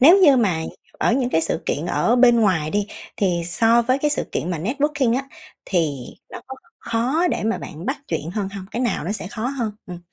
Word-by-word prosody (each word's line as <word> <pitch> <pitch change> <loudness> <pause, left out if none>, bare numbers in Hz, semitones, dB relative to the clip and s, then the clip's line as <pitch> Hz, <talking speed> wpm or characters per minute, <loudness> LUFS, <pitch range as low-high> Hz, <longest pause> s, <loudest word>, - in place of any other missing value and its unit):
nếu 330 +9 +8
như 295 -9 +6
mà 180 -9 +1 0.4
ở - - +2
những 255 -1 +1
cái 160 - +2
sự 160 0 -1
kiện 155 +5 -1
ở 230 +6 +2
bên 240 -1 +6
ngoài 170 -8 +2
đi 205 +2 0 0.3
thì 180 -4 +1
so 230 +6 +3
với 255 +3 +1
cái 295 +1 +1
sự - - 0
kiện 175 - -2
mà 170 - -2
networking 265 - 0
á, 270 - -2 0.4
thì 160 -7 0 0.3
nó - - -8
có 265 - -8 0.2
khó 250 +9 0
để - - -2
mà 225 +1 0
bạn 160 +5 -8
bắt 270 - -1
chuyện 160 -1 -3
hơn 195 0 -2
hông? 195 -1 -8
Cái 235 +3 -2
nào 235 -10 -1
nó 195 - -2
sẽ 215 - -5
khó 230 +2 -4
hơn? 245 -6 -2
Ừm. 175 -1 -7
225 Hz, 230 wpm, -22 LUFS, 180-255 Hz, 0.4 s, nếu